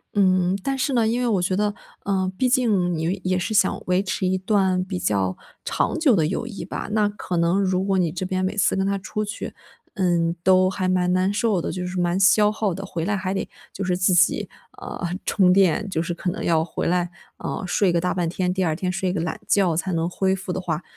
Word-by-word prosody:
嗯， 185 -1 +3
但 275 - -1
是 265 +1 -1
呢 230 -3 +3
因 235 +3 0
为 245 - +1
我 210 -5 +2
觉 180 +1 0
得， 205 +1 0 0.3
呃， 190 -1 0
毕 255 +5 +1
竟 205 - +2
你 175 +4 -2
也 185 0 +1
是 205 +5 -2
想 200 - +2
维 180 +1 +2
持 190 -1 -2
一 185 0 +1
段 190 -2 +1
比 185 0 -4
较 95 - 0 0.3
长 - - -1
久 285 -8 +4
的 160 -5 +2
友 195 +8 -2
谊 215 -4 -7
吧， - - -5
那 215 -1 +3
可 195 -3 -4
能 170 +4 +2
如 185 -1 +1
果 195 -1 +1
你 170 -3 +1
这 185 +3 -4
边 185 0 -1
每 190 +2 -1
次 205 - +2
跟 190 0 0
他 200 0 0
出 210 +2 -4
去， 210 +1 -6 0.4
嗯， 170 -3 +1
都 185 0 +5
还 185 -1 -1
蛮 180 -1 +2
难 185 +1 +2
受 210 -3 +1
的， - - -3
就 180 -1 -4
是 180 0 -3
蛮 175 +1 +1
消 210 +2 +5
耗 215 -3 -1
的。 195 +3 -6
回 170 -4 -4
来 205 +2 0
还 190 -1 -2
得 195 - -2 0.2
就 200 - -5
是 180 -1 +1
自 180 +1 +2
己， 180 +1 +3 0.3
呃， 175 - -5 0.2
充 185 -3 +4
电， 195 +1 +3
就 160 -4 -1
是 170 +1 -3
可 175 +1 -3
能 - - -5
要 160 -1 +2
回 - - -3
来， 175 0 +1 0.3
呃， - - -4
睡 180 0 +2
个 170 - +2
大 180 - 0
半 175 -2 -1
天。 180 +2 -1
第 190 0 0
二 160 -2 0
天 180 +2 -2
睡 185 0 -1
个 190 - -1
懒 165 -1 -3
觉 190 -4 +3
才 175 +3 -2
能 165 0 0
恢 190 +1 0
复 190 -1 -6
的 185 - -2
话， 175 -2 -3
185 Hz, 265 characters per minute, -23 LUFS, 180-200 Hz, 0.4 s, 都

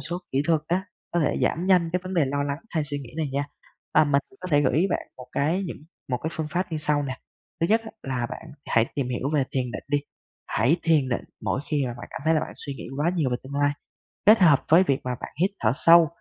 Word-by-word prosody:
số 170 +6 -4
kỹ 135 +1 +2
thuật 160 -2 +3
á, 185 +4 0 0.3
có 175 - +2
thể 150 - +1
giảm 170 - +1
nhanh 180 -3 +4
cái 180 - +1
vấn 185 0 -5
đề 165 -5 +4
lo 140 +1 -1
lắng 140 +1 -2
hay 155 -3 0
suy 145 -1 -3
nghĩ 125 -4 -9
này 155 -2 -1
nha, 140 +1 0 0.5
và - - +7
mình 140 -1 +2 0.2
có 185 - -5
thể 145 -1 +5
gửi 135 -2 +2
ý 175 +5 +3
bạn - - -2
một 125 - -10
cái 165 +7 +1
những - - -6 0.3
một 125 - +1
cái 160 - -2
phương 155 -2 -3
pháp 175 +1 -2
như 155 - -1
sau 150 -1 +1
nè. 130 -2 -4 0.4
Thứ 165 - +3
nhất 220 +3 +4
á, 220 - -7
là 125 -3 -2
bạn - - -8 0.2
hãy 115 -1 +3
tìm 135 -3 -1
hiểu 125 +2 -2
về 145 -3 +3
thiền 125 -2 -1
định - - -5
đi, 145 0 +2 0.5
hãy 125 +10 +2
thiền 155 -6 +3
định 120 - -2 0.2
mỗi 130 - 0
khi 145 -4 +1
mà 120 - -3
bạn 120 - -9
cảm - - -6
thấy 160 +1 +4
là 155 - +3
bạn - - -5
suy 140 -2 -6
nghĩ - - -8
quá 155 +4 +2
nhiều 155 -7 +1
về 125 - +1
tương 135 +2 -9
lai, 145 0 +2 0.5
kết 215 +2 +8
hợp 155 -7 +5
với 170 +4 +7
việc 135 -7 +1
mà 125 -1 -2
bạn - - -7
hít 190 +2 +3
thở 110 0 +3
sâu. 165 +3 +7
145 Hz, 275 wpm, -25 LUFS, 135-170 Hz, 0.5 s, kết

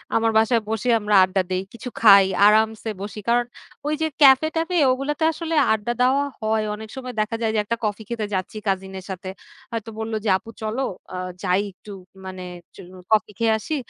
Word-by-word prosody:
আমার 225 0 +2
বাসায় 225 +1 +3
বসে 225 +3 -1
আমরা 210 -1 +1
আড্ডা 185 +1 +1
দেই, 185 +1 -1
কিছু 250 +2 -7
খাই, 200 -3 +8 0.2
আরামসে 220 +1 +3
বসি। 205 +1 -6
কারণ, 240 0 +3 0.4
ওই 300 - 0
যে 320 - +2
ক্যাফে 270 +2 +7
ট্যাফে, 330 +2 0
ওগুলোতে 280 +5 -2
আসলে 325 0 -4 0.2
আড্ডা 220 +2 -2
দেওয়া 265 +3 +3 0.2
হয়। 220 0 0
অনেক 220 +1 -10
সময় 255 -1 -6
দেখা 215 +2 -2
যায় 225 -1 +1
যে, - - +2
একটা 230 +2 -2
কফি 210 +1 -3
খেতে 230 -3 -2
যাচ্ছি 185 +3 -3
কাজিনের 190 -1 -3
সাথে। 185 0 -6 0.4
হয়তো 230 -1 -4
বলল 220 0 -4
যে, - - +1
আপু 225 +4 -14
চলো 220 +4 -2 0.3
অ - - -4 0.3
যাই, 185 +1 +2
একটু 200 +2 -14
একচু 190 +1 -21
মানে 185 -1 -7 0.7
কফি 215 -1 +3
একটু - - -19
খেয়ে 225 -1 +3
আসি। 265 +8 -4
220 Hz, 195 wpm, -22 LUFS, 200-240 Hz, 0.7 s, খাই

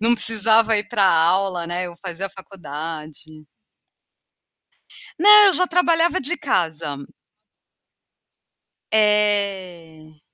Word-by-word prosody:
Não 230 +2 0
precisava 225 0 +3
ir 205 - -5
para 215 -4 -1
aula, 180 +1 0
né. 175 +1 -5
Eu 175 -1 -13
fazia 190 +1 -7
faculdade. 155 -4 -11 1.7
Não, 420 +4 +6
eu 385 - +3
já 365 - +5
trabalhava 345 0 0
de 340 +7 -1
casa. 165 - -2 1.9
É. 195 -7 -2
195 Hz, 95 wpm, -19 LUFS, 165-225 Hz, 1.9 s, Não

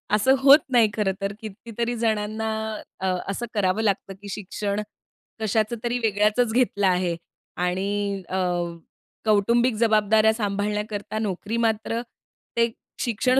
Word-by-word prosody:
असं 260 +6 +4
होत 280 +3 +8
नाही 235 -4 +5
खरं 210 -3 +1
तर. 200 +1 -1
किती 220 +1 -9
तरी 235 +1 0
जणांना 220 -1 -1 0.5
अ, - - -1 0.2
असं 200 +5 -2
करावं 205 0 +1
लागतं, 195 -1 0
की 200 - -8
शिक्षण 205 +1 -3 0.6
कशाचं 220 +1 +1
तरी 240 +1 0
वेगळंच 215 +2 +2
घेतलं 215 -6 +2
आहे 180 -2 +1 0.4
आणि 195 +2 -1
अ, 190 - -1 0.9
कौटुंबिक 235 +4 +3
जबाबदाऱ्या 220 0 +4
सांभाळण्याकरता 210 0 -2
नोकरी 210 +2 -2
मात्र 225 +1 -1 0.6
ते 230 0 +3 0.3
शिक्षण 255 +3 +2
215 Hz, 125 wpm, -24 LUFS, 200-230 Hz, 0.9 s, होत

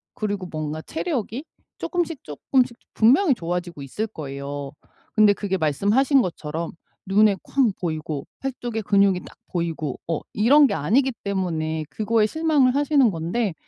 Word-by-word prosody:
그리고 205 -3 -3
뭔가 155 -1 -4
체력이 275 - -3 0.3
쪼끔씩 345 -5 -2
쪼끔씩 235 - 0 0.2
분명히 270 - +5
좋아지고 175 -3 -4
있을 210 - -3
거예요. 140 -4 -6 0.4
근데 215 -1 +6
그게 195 -2 -2
말씀하신 205 - +3
것처럼 165 -1 -4 0.3
눈에 200 +1 +4
쾅 260 -6 +2
보이고 155 -4 -3
팔뚝에 245 -4 -3
근육이 200 -2 +3
딱 - - -14
보이고 165 -5 -2
어 165 -2 -1
이런 280 +8 +6
게 - - -2
아니기 230 - +2
때문에 160 -5 -2
그거에 220 0 +2
실망을 295 -1 +2
하시는 280 -4 +4
건데 175 +5 -1
200 Hz, 325 characters per minute, -23 LUFS, 160-250 Hz, 0.4 s, 근데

